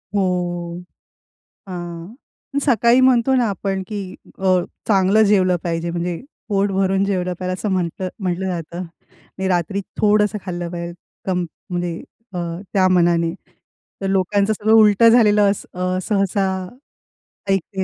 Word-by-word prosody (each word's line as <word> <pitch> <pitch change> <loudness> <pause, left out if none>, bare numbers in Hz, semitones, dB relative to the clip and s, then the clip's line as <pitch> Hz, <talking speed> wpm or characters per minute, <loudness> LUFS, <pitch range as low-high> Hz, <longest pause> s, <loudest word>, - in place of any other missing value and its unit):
हो. 175 -2 -1 0.9
हां. 175 +2 -7 0.4
अन् 280 - +1
सकाळी 240 -2 +4
म्हणतो 255 0 +3
ना 250 -2 +3
आपण 195 -1 -2
की 210 - -5 0.4
अ, 185 -1 +3 0.3
चांगलं 195 +1 +4
जेवलं 190 -3 +3
पाहिजे 170 0 -2
म्हणजे 175 0 -2 0.3
पोट 200 0 +2
भरून 195 0 +1
जेवलं 185 -2 -1
पाहिजे 185 0 -2
असं 200 +3 -3
म्हटलं 185 0 -2
म्हटलं 185 -1 -2
जातं 170 -1 -4
आणि 185 +2 -9
रात्री 185 +2 0 0.2
थोडंसं 210 -1 +3
खाल्लं 175 -2 -4
पाहिजे 170 -1 -5 0.3
कम 180 -2 0 0.2
म्हणजे 175 -1 -2 0.4
अ, - - -4 0.4
त्या 190 -2 +4
मानाने. 170 -2 +3 0.7
तर 195 - -1
लोकांचं 200 +2 +2
सगळं 215 +1 +1
उलटं 220 0 +6
झालेलं 215 -3 +5
अस 200 - -2
अ, 185 0 -1
सहसा 195 0 +1 1.0
ऐकतेय. 195 0 0
190 Hz, 135 wpm, -20 LUFS, 175-205 Hz, 1.0 s, उलटं